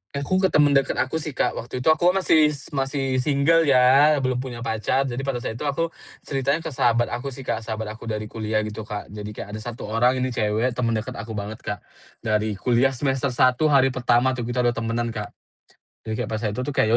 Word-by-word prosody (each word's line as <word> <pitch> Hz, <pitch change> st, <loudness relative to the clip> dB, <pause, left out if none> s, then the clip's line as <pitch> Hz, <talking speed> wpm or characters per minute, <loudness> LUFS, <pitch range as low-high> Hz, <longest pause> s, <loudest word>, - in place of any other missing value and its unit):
Aku 140 Hz, +7 st, 0 dB
ke 190 Hz, -, +4 dB
temen 150 Hz, -4 st, +4 dB
deket 135 Hz, -1 st, +2 dB
aku 130 Hz, +5 st, -1 dB
sih, 150 Hz, -3 st, -6 dB
Kak. -, -, +1 dB
Waktu 125 Hz, +2 st, -6 dB
itu 160 Hz, -, +5 dB
aku 175 Hz, +2 st, +3 dB
kan 190 Hz, +1 st, +1 dB
masih 155 Hz, -3 st, +5 dB, 0.2 s
masih 135 Hz, -1 st, -1 dB
single 150 Hz, +4 st, +3 dB
ya 135 Hz, +3 st, +6 dB
belum 130 Hz, -1 st, 0 dB
punya 125 Hz, -2 st, -6 dB
pacar, 115 Hz, +4 st, 0 dB
jadi 125 Hz, -2 st, -4 dB
pada 135 Hz, -3 st, -3 dB
saat 110 Hz, -, -4 dB
itu 150 Hz, -, -3 dB
aku 165 Hz, +4 st, -1 dB, 0.3 s
ceritain 140 Hz, +3 st, -1 dB
ke 160 Hz, -, -4 dB
sahabat 120 Hz, -2 st, +2 dB
aku 130 Hz, +3 st, -4 dB
sih, 135 Hz, 0 st, -7 dB
Kak. 120 Hz, -, -1 dB
Sahabat 110 Hz, -1 st, -5 dB
aku 110 Hz, +1 st, -10 dB
dari 110 Hz, -1 st, -2 dB
kuliah 110 Hz, -1 st, -1 dB
gitu, 110 Hz, 0 st, -6 dB
Kak, 105 Hz, -3 st, -6 dB
jadi 105 Hz, 0 st, -7 dB
kayak 105 Hz, -, -7 dB
ada 110 Hz, -, -5 dB
1 115 Hz, +2 st, -7 dB
orang 115 Hz, +4 st, +2 dB
ini 130 Hz, -, -1 dB
cewek 110 Hz, +2 st, 0 dB
temen 115 Hz, -2 st, -1 dB
deket 115 Hz, +4 st, -3 dB
aku 110 Hz, -2 st, -7 dB
banget, 105 Hz, +2 st, -5 dB
Kak, 105 Hz, -1 st, -5 dB, 0.4 s
dari 110 Hz, -1 st, 0 dB
kuliah 125 Hz, +5 st, +2 dB
semester 135 Hz, +1 st, 0 dB
1 130 Hz, +5 st, +4 dB
hari 135 Hz, -3 st, +4 dB
pertama 125 Hz, 0 st, +2 dB
tuh 120 Hz, -2 st, -4 dB
kita 125 Hz, 0 st, 0 dB
udah 120 Hz, -, +3 dB
temenan, 115 Hz, +1 st, -2 dB
Kak. 105 Hz, -2 st, -5 dB, 0.7 s
Jadi 110 Hz, -1 st, -4 dB
pas 110 Hz, 0 st, -4 dB
itu 105 Hz, -2 st, -2 dB
tuh 145 Hz, -, -3 dB
kayak 110 Hz, -, +2 dB
125 Hz, 225 wpm, -23 LUFS, 110-135 Hz, 0.7 s, ya